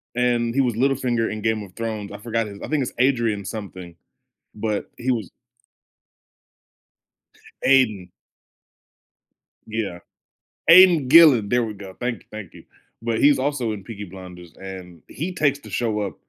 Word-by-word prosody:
and 120 -1 +1
he 135 - 0
was 125 -3 +1
Littlefinger 125 -2 0
in 110 -1 -5
Game 110 -1 0
of 90 -2 -13
Thrones, 110 -3 -4
I - - -7
forgot 115 0 -2
his 100 -1 -10
I - - -6
think 150 -3 +1
it's - - -5
Adrian-something, 105 -8 -2 0.6
but 105 -1 -3
he 130 +2 -1
was 110 -6 -4 2.3
Aidan. 110 -9 +3 1.6
Yeah. 110 -5 -4 0.7
Aiden 170 -6 +7
Gillen, 140 -9 +7
there 120 +1 +2
we 110 -2 -5
go. 95 -2 -11
Thank 120 -3 -2
you, - - -33
thank 110 -4 -9
you. - - -14 0.4
But 115 -1 -1
he's 145 -1 +5
also 130 -4 -1
in 100 -3 -8
Peaky 105 -3 -7
Blinders, 90 -2 -12
and 90 -3 -10
he 175 +6 -5
takes 145 -4 +1
the - - -13
show 110 -3 -1
up 100 -2 -3
115 Hz, 150 wpm, -22 LUFS, 100-130 Hz, 2.3 s, Aiden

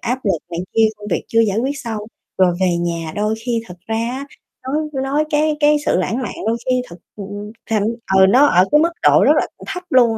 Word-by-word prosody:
áp 250 +2 -1
lực 195 -5 +1
này 170 0 -3 0.2
kia, 225 -1 +5
công 210 0 -9
việc - - -1
chưa 230 - +3
giải 215 -2 +1
quyết 275 +4 -1
xong 225 -3 -4 0.4
rồi 180 -2 +4
về 180 -2 +2
nhà 170 -2 -3
đôi 210 +1 0
khi 235 -2 0
thật 180 - -11
ra 225 - -1
á 245 +5 -3 0.4
nói 265 +3 -2 0.3
nói 285 +3 +1
cái 300 0 +1
cái 300 0 +5
sự - - +3
lãng 230 +7 -1
mạn - - -4
đôi 225 +1 +1
khi 255 -1 +1
thật, 170 - -11 0.2
ừm, 205 +1 -7 0.2
thành 215 -2 +1 0.3
ừ, 190 - +7
nó 260 +7 +6
ở 180 -9 +4
cái 300 - +6
mức 335 +2 +2
độ - - +5
rất - - +6
là - - -2 0.2
thấp 360 - -5
luôn 250 -3 +5
225 Hz, 235 wpm, -19 LUFS, 195-265 Hz, 0.4 s, ừ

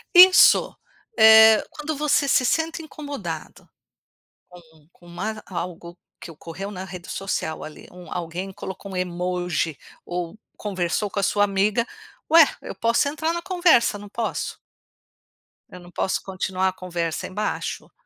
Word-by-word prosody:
Isso, 365 +1 +7 0.4
eh, 220 0 +8
quando 300 +1 -5
você 290 0 +1
se 260 -1 +3
sente 325 +4 0
incomodada, 280 - -8 1.0
com 155 -2 -24
com 175 - -23
uma 215 +5 -5
algo 170 -1 -6 0.2
que - - -9
ocorreu 165 +5 -8
na 185 -2 -6
rede 180 -1 -10
social 190 -5 -3
ali, 155 - -11
um 180 -2 -13
alguém 175 +3 -5
colocou 190 +1 -8
um - - -7
emoji 180 -3 -2 0.3
ou 175 +2 -5 0.2
conversou 190 0 -2
com 200 - -3
a - - -1
sua 205 +2 +2
amiga, 205 +3 +1 0.5
ué, 325 -1 +9 0.2
eu - - -8
posso 230 +4 +1
entrar 315 +3 -2
na 340 - -3
conversa, 345 - +3
não 205 0 -11
posso? 225 +2 -4 1.1
Eu 180 - -11
não 175 0 -15
posso 190 - -1
continuar 190 0 -2
a - - -7
conversa 170 -3 -4
embaixo? 210 +3 -4
195 Hz, 145 wpm, -23 LUFS, 175-235 Hz, 1.1 s, ué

